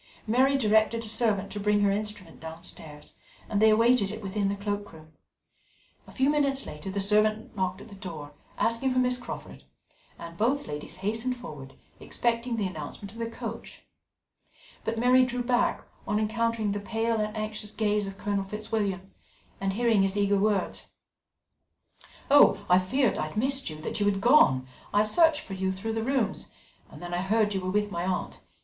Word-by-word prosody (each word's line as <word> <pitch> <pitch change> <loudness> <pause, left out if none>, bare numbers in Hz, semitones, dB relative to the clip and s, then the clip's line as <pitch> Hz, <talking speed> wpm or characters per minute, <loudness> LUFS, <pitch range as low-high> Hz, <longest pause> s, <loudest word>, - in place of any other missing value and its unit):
Mary 260 +5 +3
directed 220 -1 +2
a - - -8
servant 215 -3 0
to 205 - -4
bring 205 0 +2
her 200 -1 +3
instrument 205 -4 -5
downstairs, 160 -2 -9 0.3
and 205 -1 0
they 220 - +7
awaited 230 -1 +4
it 215 +1 -6
within 200 +1 -1
the 200 - 0
cloak 205 0 -4
room. 155 0 -15 0.9
A - - -12
few 265 0 +1
minutes 280 -2 +1
later 150 +5 -7
the 195 +1 -2
servant 215 +2 +2
knocked 185 0 -2
at - - -11
the - - -12
door, 165 -7 -8 0.3
asking 230 +3 +1
for 255 - -1
Miss 250 0 +3
Crawford, 245 - -8 0.5
and 170 0 -9
both 265 +6 +1
ladies 150 0 -6
hastened 225 +4 -1
forward, 145 - -10 0.2
expecting 235 0 -1
the 215 -3 -1
announcement 185 +3 -6
of 225 - -12
their 230 0 -2
coach, 230 -1 -7 1.0
but 225 +1 -2
Mary 250 +2 +5
drew 250 0 -2
back 245 0 +1 0.2
on 210 - +1
encountering 225 -1 0
the 205 - -2
pale 225 +2 -1
and 215 +1 -3
anxious 215 -1 -4
gaze 210 -2 0
of 195 0 -8
Colonel 200 -1 -1
Fitzwilliam, 205 -2 -3 0.5
and 195 0 -1
hearing 230 -1 +3
his 195 +1 +1
eager 200 0 +2
words: 205 -2 0 1.4
"I 185 -10 +6
feared 250 +6 +1
I 155 - -1
had 155 - -9
missed 270 +1 +1
you 155 0 -8
that 160 - -3
you 205 - +2
had 200 -1 +1
gone 195 - +5 0.2
I 205 +1 +4
searched 315 +7 +3
for 195 - -9
you 190 0 -1
through 195 +4 -4
the 225 - -1
rooms 255 -2 -1 0.4
and - - -12
then 175 0 -6
I 175 - 0
heard 210 +2 +1
you 190 - -1
were 185 - -3
with 210 +1 0
my 170 -1 -2
aunt. 185 0 -3
210 Hz, 180 wpm, -27 LUFS, 195-230 Hz, 1.4 s, they